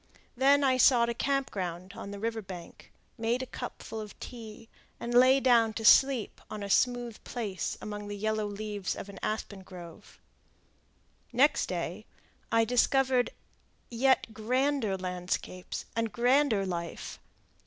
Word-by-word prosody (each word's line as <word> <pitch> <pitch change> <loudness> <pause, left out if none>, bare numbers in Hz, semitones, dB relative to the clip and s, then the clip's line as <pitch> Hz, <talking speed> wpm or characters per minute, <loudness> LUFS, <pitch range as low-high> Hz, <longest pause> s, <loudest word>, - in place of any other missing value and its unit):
Then 280 +3 +4
I 260 -1 +3
sought 240 -2 +5
a - - 0
camp 275 +2 0
ground 185 0 -5
on 225 -3 -7
the 200 - -6
river 225 +2 -2
bank, 180 -4 -10 0.3
made 235 +3 0
a - - -4
cupful 220 -3 -7
of 210 -2 -10
tea, 225 -2 -9 0.3
and 235 +1 -4
lay 255 +2 +6
down 235 -4 +4
to 225 0 -4
sleep 265 -1 +5
on 210 -1 -5
a 200 - -3
smooth 245 -2 +1
place 210 -6 -4
among 210 -1 -6
the 205 0 -5
yellow 215 0 -1
leaves 205 -1 -4
of 200 - -7
an 200 - -10
aspen 215 -2 -3
grove. 175 -3 -12 1.1
Next 275 +5 +3
day - - -4 0.4
I 230 0 +4
discovered 250 +1 +3 0.6
yet 245 -1 +2
grander 245 -1 0
landscapes 180 0 -4
and 230 -1 0
grander 245 -4 +3
life. 170 -2 -5
225 Hz, 145 wpm, -30 LUFS, 200-250 Hz, 1.1 s, lay